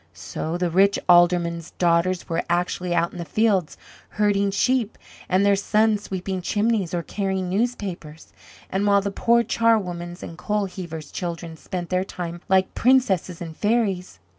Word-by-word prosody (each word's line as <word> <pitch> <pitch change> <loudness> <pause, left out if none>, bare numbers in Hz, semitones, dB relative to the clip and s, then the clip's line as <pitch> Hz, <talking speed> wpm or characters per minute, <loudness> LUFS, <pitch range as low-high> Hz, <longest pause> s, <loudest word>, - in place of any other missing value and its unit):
So 95 - -4
the 175 -1 -1
rich 195 +3 +4
Aldermen's 175 -1 +3
daughters 175 +1 +1
were 165 - -1
actually 175 0 0
out 170 0 +1
in 175 - -9
the - - -3
fields 195 0 +1 0.4
herding 200 -1 +2
sheep, 230 +2 0 0.3
and 185 +2 +3
their 200 0 +5
sons 210 +1 +2
sweeping 190 -1 -4
chimneys 205 -2 0
or 170 - -2
carrying 190 0 -2
newspapers; 190 -8 -3 0.4
and 195 +2 0
while 200 0 +4
the 200 0 -3
poor 235 +3 +3
charwomen's 180 -7 0
and 165 - -9
coal 210 +2 0
heavers, 170 -5 -7
children 170 -2 -5
spent 175 +1 -6
their 185 0 +1
time 175 -3 -6
like 190 0 +3
princesses 200 -9 +2
and 160 -2 -8
fairies. 205 - 0
185 Hz, 155 wpm, -23 LUFS, 175-205 Hz, 0.4 s, their